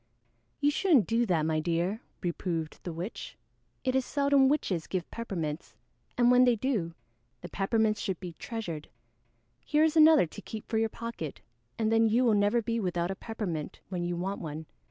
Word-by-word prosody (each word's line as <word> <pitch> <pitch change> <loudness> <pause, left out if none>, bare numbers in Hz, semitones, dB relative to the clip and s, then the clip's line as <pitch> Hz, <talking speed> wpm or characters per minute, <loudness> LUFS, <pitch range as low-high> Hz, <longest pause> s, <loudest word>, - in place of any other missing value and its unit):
"You 290 0 +3
shouldn't 305 - +4
do 230 +1 +1
that, 170 -5 +2
my 160 -1 +1
dear," 175 +6 -1 0.2
reproved 170 -2 -3
the 175 - -5
witch. 175 +7 -6 0.5
"It 255 - +1
is 265 - +3
seldom 280 -1 +3
witches 195 - 0
give 185 -3 -3
peppermints, 170 -9 -4 0.4
and 245 0 +5
when 250 0 +6
they 245 -2 +4
do 210 -9 -1 0.5
the - - -8
peppermints 215 +2 +1
should 190 -4 -2
be 180 -3 -7
treasured. 170 -6 -6 0.7
Here 300 0 +2
is 320 0 +2
another 315 - +7
to 155 - -10
keep 220 -1 -8
for 220 - 0
your 225 0 +1
pocket, 230 -11 -6 0.4
and 220 -1 +1
then 225 0 +4
you 235 +4 +3
will 230 - +4
never 205 +3 +2
be 230 +1 -1
without 175 -3 -1
a - - -3
peppermint 190 -9 -5
when 180 -2 -3
you 175 0 -2
want 190 +3 -3
one." 155 -1 -6
210 Hz, 180 wpm, -29 LUFS, 175-240 Hz, 0.7 s, another